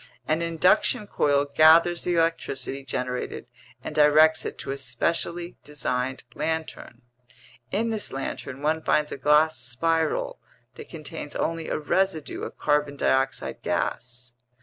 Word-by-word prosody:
An 155 +2 +1
induction 170 +5 +2
coil 145 -7 +1
gathers 160 +4 +5
the 175 - +1
electricity 140 -5 -1
generated 125 -1 -4 0.4
and - - -5
directs 155 +1 +5
it - - -5
to - - -5
a 135 - -3
specially 170 +7 -2
designed 130 -3 -3
lantern. 160 -6 -4 0.7
In 225 +3 -1
this 215 -2 -2
lantern 135 0 -5
one 160 +1 +1
finds 150 -1 +1
a - - -4
glass 150 +3 +3
spiral 165 - 0 0.3
that - - -11
contains - - -8
only 165 -1 -2
a - - -1
residue 160 +1 -1
of - - -7
carbon 145 -1 0
dioxide 135 0 0
gas. 125 +1 -2
150 Hz, 130 wpm, -25 LUFS, 135-165 Hz, 0.7 s, gathers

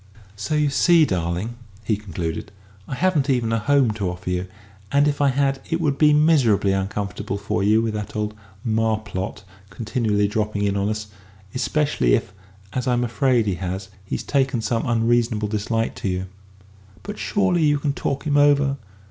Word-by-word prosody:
"So 105 +10 -2
you 150 -1 +2
see, 170 +3 +5
darling," 90 - -2 0.3
he 105 +1 +1
concluded, 90 -6 -5 0.4
"I - - -4
haven't 155 -3 +1
even 120 -4 +1
a 115 - +1
home 135 0 +3
to 105 -4 -2
offer 90 +1 -5
you; 90 +1 -2 0.4
and 140 +1 +4
if 145 0 0
I 140 - +4
had, 135 0 +1
it 165 0 0
would 145 -4 0
be 150 -1 +6
miserably 145 -10 +4
uncomfortable 100 +1 -2
for 100 -1 -2
you 110 +3 +3
with 110 -1 -1
that 105 0 -5
old 105 0 -2 0.3
Marplot 110 -2 -1 0.3
continually 105 -1 0
dropping 105 -1 -1
in 100 -1 +1
on 100 +1 0
us 110 0 -3 0.5
especially 130 - +1
if, - - -3 0.4
as 130 0 -2
I'm 120 -1 +2
afraid 120 0 +2
he 100 - 0
has, 95 +1 -4
he's 95 - -4
taken 135 -3 +1
some 115 +2 -1
unreasonable 115 -2 +1
dislike 115 +2 -1
to - - -3
you." 90 0 -2 0.8
"But 205 0 -7
surely 190 -4 +1
you 145 -1 +4
can 145 -1 -1
talk 140 0 -3
him 145 -1 +2
over?" 145 -1 +4
115 Hz, 175 wpm, -22 LUFS, 100-140 Hz, 0.8 s, be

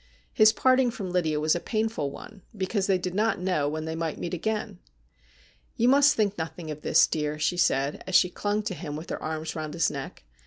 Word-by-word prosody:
His 215 0 +6
parting 255 +2 +3
from 195 -6 -5
Lydia 160 -4 0
was 155 +1 +2
a - - -1
painful 215 -8 -2
one, 200 +8 -11 0.2
because 195 +1 -1
they 190 -2 +3
did 180 0 -4
not 215 +1 +1
know 180 -6 0
when 155 +1 -4
they 160 - -3
might 165 -2 -3
meet 175 - -5
again. 210 - -3 0.5
' 65 -1 -32
You 240 +2 +3
must 285 +2 +5
think 205 -4 0
nothing 160 0 -5
of 150 0 -7
this, - - +5
dear,' 150 -1 -2
she 155 +3 0
said, 140 -4 +1
as 190 - -1
she 180 - +5
clung 205 +2 -1
to 205 - -3
him 150 -5 -6
with 155 +3 -7
her - - -4
arms 155 0 -4
round 155 -1 -5
his 165 -3 +2
neck. 140 -2 -7
175 Hz, 225 wpm, -26 LUFS, 155-210 Hz, 0.5 s, His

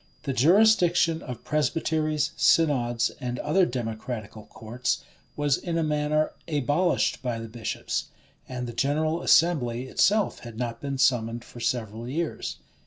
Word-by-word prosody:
The 140 - -2
jurisdiction 175 - +4
of 125 -3 -8
presbyteries, 155 0 0
synods, 120 -7 +2
and 125 -1 -3
other 165 +8 +2
democratical 110 -2 -5
courts, 120 +2 -3 0.3
was 145 -2 +1
in 170 -2 -3
a 165 - +1
manner 150 0 +1 0.2
abolished 150 +3 +1
by 125 -2 -2
the 115 0 -6
bishops; 115 0 -4 0.4
and 125 -1 -4
the 120 - -6
general 155 +6 0
assembly 130 -11 +3
itself 205 +10 +2
had 115 -2 -10
not 115 -1 -4
been 140 -1 -3
summoned 120 -3 +1
for 120 - -12
several 115 -1 -2
years. 160 +5 -3
135 Hz, 135 wpm, -26 LUFS, 120-155 Hz, 0.4 s, jurisdiction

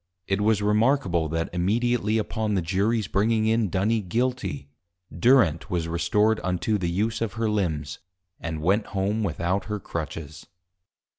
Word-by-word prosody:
[It 95 +2 0
was 105 -1 +2
Remarkable, 105 - +2
that 80 +1 -2
immediately 110 +4 +1
upon 110 -1 -1
the 90 - 0
Juries 100 +5 0
bringing 110 +3 +1
in 110 -2 +2
Duny 105 +6 +1
Guilty, 100 - -2 0.5
Durent 95 - +3
was 85 -3 -1
restored 95 +7 +2
unto 95 +4 0
the 90 -2 -1
use 105 +7 -1
of 115 -3 -1
her 115 0 -1
Limbs, 80 -9 -2 0.4
and 80 -2 -5
went 100 +5 +2
home 100 +3 0
without 90 +1 -1
her 105 -1 -3
Crutches. 80 -3 -6
100 Hz, 145 wpm, -25 LUFS, 85-110 Hz, 0.5 s, Durent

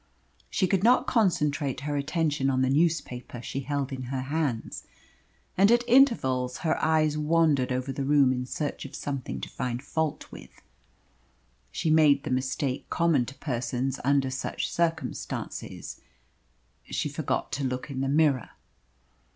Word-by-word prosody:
She 190 - +1
could 190 0 +1
not 250 +3 +5
concentrate 155 - +1
her 145 0 -2
attention 145 -1 0
on 130 -1 +2
the 130 - +2
newspaper 140 -6 0
she 130 - -5
held 140 0 -2
in 130 -1 -5
her 130 +1 -3
hands, 140 -4 -2 0.7
and 200 +4 +5
at 240 0 +4
intervals 135 - +3
her 160 - +1
eyes 155 -1 +2
wandered 150 -4 +2
over 130 +1 -2
the 135 - -3
room 140 -2 +4
in 125 0 -3
search 145 +2 -3
of 140 - -9
something 140 -3 -4
to - - -4
find 125 0 -4
fault 160 +1 -2
with. - - -13 1.1
She 165 -3 -1
made 150 -3 +5
the - - -4
mistake 130 +1 -2
common 160 -8 +2
to 135 - -8
persons 125 0 -2
under 135 0 +2
such 130 - -3
circumstances 165 -6 -3 0.8
she - - -2
forgot - - -2
to 140 - -2
look 130 +2 -3
in 130 -1 -3
the 135 - 0
mirror. 145 -4 +2
140 Hz, 150 wpm, -27 LUFS, 130-160 Hz, 1.1 s, not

